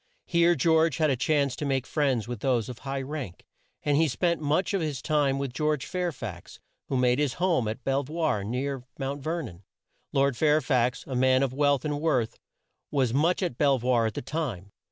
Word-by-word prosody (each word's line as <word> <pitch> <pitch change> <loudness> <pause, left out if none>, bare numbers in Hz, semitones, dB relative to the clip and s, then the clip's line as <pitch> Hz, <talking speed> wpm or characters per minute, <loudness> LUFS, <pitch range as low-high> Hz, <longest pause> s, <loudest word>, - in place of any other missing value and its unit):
Here 170 0 +3
George 160 +1 +3
had 155 -3 +2
a - - +2
chance 140 0 +1
to - - -5
make 135 -2 0
friends 135 -7 0
with 120 -3 -5
those 125 -1 0
of 125 - -8
high 135 -1 -4
rank, 135 - -6 0.4
and 145 -1 +2
he 160 +1 +4
spent 165 +6 0
much 155 +7 +1
of 195 - +1
his 150 -4 -2
time 145 -2 +1
with 135 -2 -3
George 150 0 0
Fair 180 -1 -2
fax 105 - -8 0.3
who 135 - -1
made 125 +1 +3
his 145 -4 +1
home 170 -10 +1
at 110 +4 -4
Bel 135 +2 +1
voir, 150 -7 -1
near 130 +4 -3
Mount 140 +1 -3
Ver 165 +4 -2
non. 90 -8 -10 0.5
Lord 140 -1 +2
Fair 150 +4 +3
fax, 125 -3 0
a 135 - -6
man 130 +1 +3
of 130 -2 -1
wealth 145 -1 +2
and 145 -1 -2
worth 130 -8 0 0.5
was 130 -5 +1
much 165 +7 +2
at 135 -9 -3
Bel 140 -2 +4
voir 120 -2 +2
at 110 - -5
that - - -5
time. 120 - -4
140 Hz, 210 wpm, -27 LUFS, 125-155 Hz, 0.5 s, he